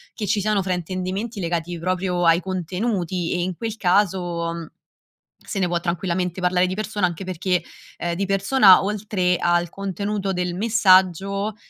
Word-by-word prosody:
che 215 - -3
ci 205 - +1
siano 210 -1 +1
fraintendimenti 185 +4 -3
legati 170 -1 -2
proprio 180 0 -1
ai 165 +1 +5
contenuti 185 -1 -2
e 180 - -1
in 180 0 -2
quel 225 +3 -5
caso 175 -4 0 0.7
se 200 - -5
ne 180 - +2
può 175 0 0
tranquillamente 180 +1 -2
parlare 180 0 +2
di 185 - -3
persona 210 -1 -1
anche 175 +2 -6
perché, 185 0 -1 0.3
ehm, 170 0 -2
di 195 - -1
persona, 195 0 +5
oltre 195 -3 0
al 175 0 +1
contenuto 200 +1 -3
del 180 -1 -2
messaggio, 195 -1 +3
185 Hz, 150 wpm, -22 LUFS, 175-200 Hz, 0.7 s, ai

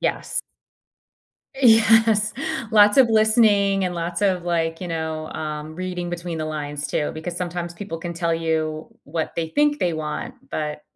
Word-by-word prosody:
Yes. - - -1 1.1
Yes. 225 -3 +5 0.4
Lots 210 0 +6
of 260 -3 +7
listening 215 -3 +4
and 180 -1 -2
lots 170 +3 -3
of, 185 -3 +1
like, 165 -1 -1
you 180 - -5
know, 160 -1 -3
um, 155 0 -5
reading 180 -1 -4
between 170 -1 -4
the 155 - -2
lines, 150 -1 -4
too. 150 - -1
Because 170 +2 -6
sometimes 175 -1 -4
people 180 -4 -6
can 170 +1 -5
tell 170 -1 0
you 160 -1 -2 0.2
what 160 +2 -3
they 165 -1 -2
think 295 - +2
they 175 -2 +1
want, 155 +11 -4 0.2
but 150 -1 -3
175 Hz, 160 wpm, -22 LUFS, 160-205 Hz, 1.1 s, of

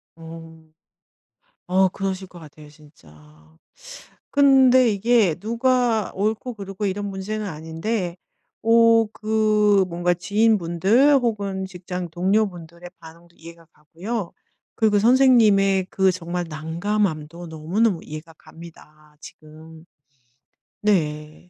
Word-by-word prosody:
어. 165 0 -12 1.0
어 190 +1 +3
그러실 190 0 -5
것 180 - -15
같아요, 155 -2 -14
진짜. 150 - -20 1.2
근데 265 -3 +5
이게 210 -4 +2
누가 230 +1 0
옳고 220 +5 -2
그르고 195 0 -6
이런 205 +1 -3
문제는 205 +2 -5
아닌데 170 +3 -4 0.5
어 230 0 +5
그 215 -2 +2
뭔가 175 +1 0
지인분들 205 - +2
혹은 200 -6 -2
직장 180 -1 -7
동료분들의 175 -2 -2
반응도 170 +1 -16
이해가 165 0 -14
가고요. 175 +7 -6 0.4
그리고 215 -2 +2
선생님의 210 -6 +4
그 190 -1 +2
정말 175 0 -5
난감함도 165 0 -3
너무너무 170 +5 -1
이해가 155 +2 -10
갑니다, 155 -2 -16
지금. 160 +1 -14 1.0
네. 155 -5 -2
190 Hz, 230 characters per minute, -22 LUFS, 165-215 Hz, 1.2 s, 근데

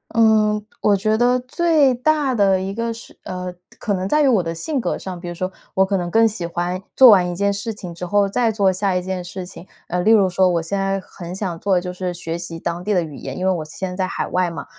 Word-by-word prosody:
嗯， 215 -2 +3 0.2
我 205 -1 +4
觉 215 +2 +1
得 245 +1 +3
最 295 +1 +2
大 285 +2 +1
的 195 -4 +3
一 190 +1 -3
个 230 +2 -2
是 230 - -13
呃， 180 0 -5 0.2
可 210 - -2
能 185 -1 -2
在 300 +9 +2
于 285 - +4
我 230 -7 +4
的 165 -1 -4
性 280 - -2
格 - - -1
上， 185 -2 -7
比 175 - -8
如 175 - -4
说 185 +2 -3 0.2
我 190 0 +3
可 195 0 0
能 175 -1 -3
更 225 +5 +4
喜 205 -6 -1
欢 175 +2 -3
做 260 -2 +9
完 185 -4 +5
一 175 - -4
件 200 +2 +1
事 200 +3 -4
情 180 -4 -8
之 170 +2 -6
后 200 +2 +2
再 230 +3 +1
做 200 -3 +2
下 185 0 0
一 180 - +1
件 185 0 -4
事 180 +1 -7
情， 180 0 -12 0.2
呃， 180 +1 -1
例 215 +5 +3
如 200 -4 +5
说 185 +1 +3
我 170 -1 +1
现 195 +5 -3
在 195 0 -1
很 180 -1 -9
想 185 -4 -4
做 195 +1 +1
的 180 - +2
就 180 - -5
是 180 0 -4
学 170 -1 -5
习 170 -1 -6
当 170 +2 -4
地 210 - +1
的 180 - +3
语 155 -3 -8
言， 135 -1 -7
因 185 - -2
为 190 - +3
我 165 -4 -2
现 185 +5 -5
在 180 - -7
在 185 -1 0
海 - - -3
外 180 -1 0
嘛， 170 - -7
190 Hz, 295 characters per minute, -20 LUFS, 180-215 Hz, 0.2 s, 做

